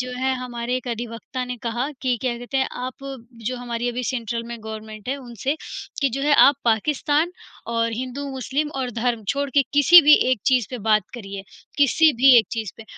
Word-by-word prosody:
जो 250 - -4
है 265 +1 +1
हमारे 245 -1 -4
एक 255 0 -6
अधिवक़्ता 235 +2 -5
ने 250 0 -5
कहा 240 +3 -2
कि 255 -2 +1
क्या 250 -2 -1
कहते 245 +3 -5
हैं? 265 0 +2
आप 255 0 -5 0.5
जो 255 - -1
हमारी 240 -1 -3
अभी 245 +1 -3
सेंट्रल 235 -2 -3
में 235 0 -6
गवर्नमेंट 220 0 -8
है 270 - -1
उनसे 260 +2 -3 0.5
कि 280 - +3
जो 275 - -3
है 290 0 +4
आप 280 - +5
पाकिस्तान 290 - +1 0.3
और 230 0 -1
हिंदू, 255 +4 -5
मुस्लिम 270 +3 -2
और 250 -1 -2
धर्म 230 -1 -2
छोड़ 280 0 0
के 280 +1 +4
किसी 290 +5 +8
भी 300 +1 +8 0.2
एक 255 -5 +1
चीज़ 255 -5 +3
पे 250 - -5
बात 215 0 +2
करिए, 200 -4 -7 0.4
किसी 295 +3 +5
भी 260 +1 +7
एक 220 - +2
चीज़ 220 -5 -3
पे, 225 - -11
250 Hz, 205 wpm, -22 LUFS, 230-270 Hz, 0.5 s, किसी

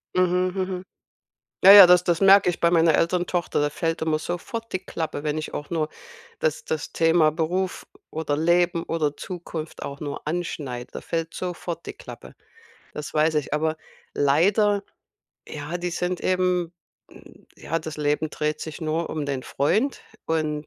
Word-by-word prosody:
Mhm, 185 0 +2
mhm. 185 -1 -3 0.8
Ja, 195 - +10
ja, 200 -2 +12
das 180 0 +6
das 175 -1 +1
merke 195 -1 +7
ich 175 - -3
bei 170 - +3
meiner 165 -2 +4
älteren 175 +1 +1
Tochter. 175 -4 -1
Da 145 - +1
fällt 165 +2 -2
immer 160 -1 +1
sofort 190 +8 -5
die 185 - 0
Klappe, 160 -4 -4
wenn 150 0 -1
ich 155 - -5
auch 145 - -5
nur 155 -3 -1 0.5
das - - -1
das 470 -1 -3
Thema 165 -1 +3
Beruf 175 +4 -2 0.2
oder 155 -2 -2
Leben 170 +2 +2
oder 150 -3 -1
Zukunft 170 -3 -7
auch 140 0 -6
nur 145 0 -6
anschneide. 145 -7 -4
Da - - -7
fällt 165 0 -3
sofort 175 -2 -5
die - - -6
Klappe. - - -12 0.6
Das 150 -1 -6
weiß 155 +1 +2
ich, 150 - -2
aber 155 +1 0 0.4
leider 195 +9 +3 0.6
ja, 150 +3 -5
die 175 0 -3
sind 180 +1 -2
eben 180 -2 0 0.4
m - - -17
ja, 165 - -2
das 160 -1 -7
Leben 150 +1 0
dreht 150 +1 -2
sich 160 +1 -7
nur 160 +1 -2
um 150 -2 -3
den 135 -2 -3
Freund 215 - 0 0.3
und 155 -2 -1
165 Hz, 170 wpm, -24 LUFS, 155-180 Hz, 0.8 s, ja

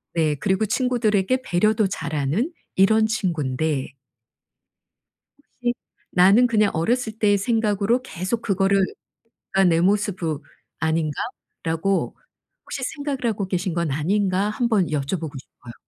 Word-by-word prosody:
네 160 -2 +2
그리고 190 +8 0
친구들에게 245 -1 +1
배려도 215 +3 +2
잘하는 155 - -2 0.2
이런 220 +3 +4
친구인데 160 -9 -1 1.7
혹시 240 0 +1 0.4
나는 195 +7 +6
그냥 215 -3 +2
어렸을 220 +6 -1
때의 205 -2 +4
생각으로 215 +2 +1
계속 195 +1 -3
그거를 195 -2 +2 0.7
그러니까 190 -3 +4
'내 165 - +2
모습으 185 -6 0 0.4
아닌가?'라고 160 - -2 0.5
혹시 - - -5
생각을 285 -2 -3
하고 210 -4 -1
계신 180 -1 -1
건 170 -3 -1
아닌가 190 +6 +1
1 235 +3 0
번 205 -6 +3
여쭤보고 150 +2 -2
싶어요. 120 -2 -14
195 Hz, 285 characters per minute, -23 LUFS, 165-220 Hz, 1.7 s, 나는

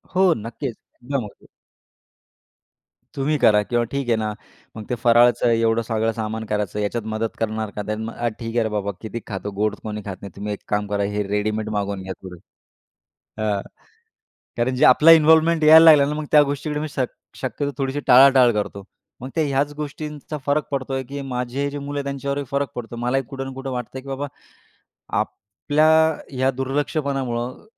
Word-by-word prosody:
हो, 185 -2 +5
नक्कीच. 115 +2 -5 0.3
एकदम 135 -2 -2
ओके. 105 - -15 1.7
तुम्ही 145 +2 0
करा. 110 -6 +5
किंवा 120 +2 0
ठीक 140 -3 -2
आहे 115 - +4
ना, 105 -1 -2 0.4
मग 110 - -6
ते 125 - 0
फराळचं 120 +1 +5
एवढं 115 0 +2
सगळं 110 0 +1
सामान 110 0 -3
करायचं 105 -1 -2
याच्यात 105 +2 -2
मदत 110 +1 -2
करणार 110 -1 -2
का 105 - -3 0.2
मग 110 +1 -5
अ, 120 - -2
"ठीक 115 0 -5
आहे 120 - +3
रे 110 - -1
बाबा, 100 -1 -2
किती 115 +1 -5
खातो 100 -1 -5
गोड 105 0 +1
कोणी 105 -1 -5
खात 100 -2 -5
नाही, 100 - -8
तुम्ही 105 +1 -4
एक 100 - -8
काम 105 0 -1
करा 100 0 -1
हे 105 - 0
रेडीमेड 105 +1 -1
मागवून 100 -1 -2
घ्या 95 0 -5
थोडे." 90 -2 -10 1.0
हं, 105 -2 0 1.0
कारण 125 +2 0
जे 125 - +4
आपला 155 +6 +7
इन्व्हॉल्वमेंट 160 0 +5
यायला 160 +1 +9
लागला 150 -3 +8
ना, - - -1
मग 155 - -4
त्या 150 - +8
गोष्टीकडे 150 +1 -3
मी 155 - -3
शक् 130 -3 -2 0.2
शक्यतो 140 +2 -3
थोडीशी 135 +1 -2
टाळाटाळ 130 -1 +7
करतो. 100 -1 -8 0.4
मग 130 - -6
ते 160 - +2
ह्याच 140 +1 0
गोष्टींचा 150 0 -6
फरक 145 +1 +1
पडतोय 135 -1 -2
की 140 0 -5
माझे 125 +3 -2
जे 145 - -5
मुलं 145 +1 -5
आहेत, - - -3
त्यांच्यावरही 140 +1 -3
फरक 140 0 0
पडतो 120 -1 -6
मलाही 125 +3 0
कुठं 135 -1 -5
ना 135 - -6
कुठं 135 0 -5
वाटतं 125 +1 -5
की 135 - -14
बाबा 135 +1 -3 0.9
आपल्या 145 +10 -1 0.4
ह्या 130 -1 +1
दुर्लक्षपणामुळं 135 -2 -2
125 Hz, 180 wpm, -22 LUFS, 110-140 Hz, 1.7 s, यायला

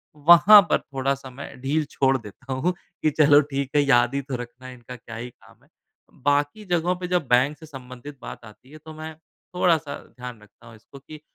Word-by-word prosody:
वहाँ 175 +7 +8
पर - - +3
थोड़ा-सा 135 -1 -4
मैं 130 0 -10
ढील 150 +3 0
छोड़ 135 -1 +2
देता 125 +4 -9
हूँ 160 +8 0 0.3
कि 155 - +3
चलो 145 -1 +6
ठीक 135 -1 -2
है 145 - +5
याद 120 -2 +3
ही 140 - 0
तो 135 -1 -6
रखना 130 +1 -11
इनका 125 0 -11
क्या 115 -1 -11
ही 120 +2 -6
काम - - -23
है। - - -28 0.6
बाकी 145 +8 0
जगहों 175 0 0
पे 180 0 -6
जब 175 -6 -1
बैंक 130 +5 +2
से 160 - -13
संबंधित 135 0 -11
बात 120 - -9
आती 115 +6 -17
है 155 - -11
तो 155 - -9
मैं 155 0 -8 0.4
थोड़ा-सा 160 -5 +1 0.2
ध्यान 125 -3 -9
रखता 105 +3 -20
हूँ 115 - -13
इसको 135 +5 -16
कि 155 -1 -11
140 Hz, 205 wpm, -23 LUFS, 125-155 Hz, 0.6 s, वहाँ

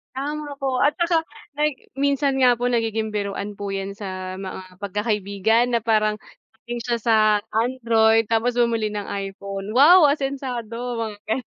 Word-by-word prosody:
Tama 290 +1 -4
po, 260 -2 0
at 290 +1 +3
saka 335 -2 +1 0.3
pag 300 -1 +2 0.2
minsan 280 -1 +1
nga 250 -2 +5
po 245 +1 -1
nagiging 225 -2 -1
biruan 200 0 -4
po 200 -1 -4
yan 195 +1 -5
sa 185 -2 -6
mga 185 -1 -8
pagkakaibigan 210 +3 0
na 230 - +1
parang 215 -2 +2 0.5
galing 240 0 -4
siya 235 +1 -2
sa 225 -2 +3 0.3
Android 225 -1 +3
tapos 230 +2 +1
bumili 230 -3 +1
ng 205 -1 -5
iPhone, 195 +1 -5
"Wow, 310 +5 +8
asensado", 250 -4 -3
mga 210 -2 -5
gan 250 +4 -1
225 Hz, 150 wpm, -22 LUFS, 205-255 Hz, 0.5 s, Wow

